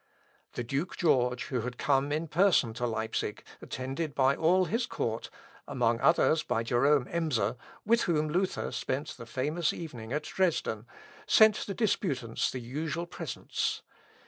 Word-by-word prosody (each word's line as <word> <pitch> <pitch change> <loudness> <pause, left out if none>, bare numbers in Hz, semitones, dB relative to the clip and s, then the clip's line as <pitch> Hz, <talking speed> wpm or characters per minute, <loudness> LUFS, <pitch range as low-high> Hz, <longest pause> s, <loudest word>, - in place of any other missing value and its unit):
The 120 - -3
Duke 140 +9 -3
George, 125 -6 +2
who 125 -3 -1
had 125 +2 -5
come 140 0 +1
in 155 +2 -1
person 160 - +3
to 120 +1 -2
Leipsic, 110 -2 -3 0.2
attended 135 +4 -4
by 135 0 +4
all 180 +3 +3
his 235 +6 -1
court 115 - -3 0.4
among 120 -4 +1
others 160 -1 +4
by 115 -2 -1
Jerôme 130 +3 +3
Emser, 130 -10 0 0.3
with 230 +2 +4
whom 155 -4 +1
Luther 180 +5 -1
spent 140 +3 -3
the 115 - -9
famous 150 +7 0
evening 125 -9 -7
at 150 +2 -1
Dresden, 150 - -1 0.4
sent 220 -1 +5
the 200 - -4
disputants 140 - 0
the 130 - -5
usual 150 +7 -3
presents. 175 - -3
140 Hz, 145 wpm, -30 LUFS, 125-170 Hz, 0.4 s, sent